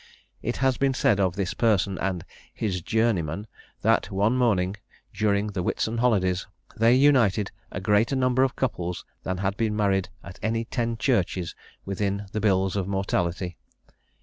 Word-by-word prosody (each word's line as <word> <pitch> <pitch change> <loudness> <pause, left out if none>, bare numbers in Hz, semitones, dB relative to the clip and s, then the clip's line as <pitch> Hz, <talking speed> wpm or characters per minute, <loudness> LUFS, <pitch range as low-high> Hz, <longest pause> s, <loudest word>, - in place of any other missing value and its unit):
It 120 - -2
has 130 -2 +3
been 135 -1 +1
said 105 -5 +3
of 95 -2 +1
this 100 -3 -2
person 100 -4 +1
and 95 -3 -2 0.3
"his 95 -5 -2
journeyman," 100 -4 0 0.4
that - - +3
one 100 +5 +1
morning, 105 -6 +1 0.4
during 105 0 +1
the 95 -2 -2
Whitsun 110 +5 -1
holidays, 95 -7 +2 0.3
they 115 +2 +4
united 120 -8 +4 0.2
a - - -4
greater 105 +7 +2
number 125 -1 +2
of 130 -1 +2
couples 90 -9 -2 0.2
than 95 0 -3
had 95 +1 -1
been 110 -2 0
married 95 -3 +1
at 95 - -11
any 115 +1 -1
ten 115 0 -2
churches 95 -8 0 0.3
within 100 +1 -2
the 110 - -2
bills 95 -2 +2
of 95 -2 -1
mortality. 90 -2 -1
100 Hz, 155 wpm, -26 LUFS, 95-115 Hz, 0.4 s, they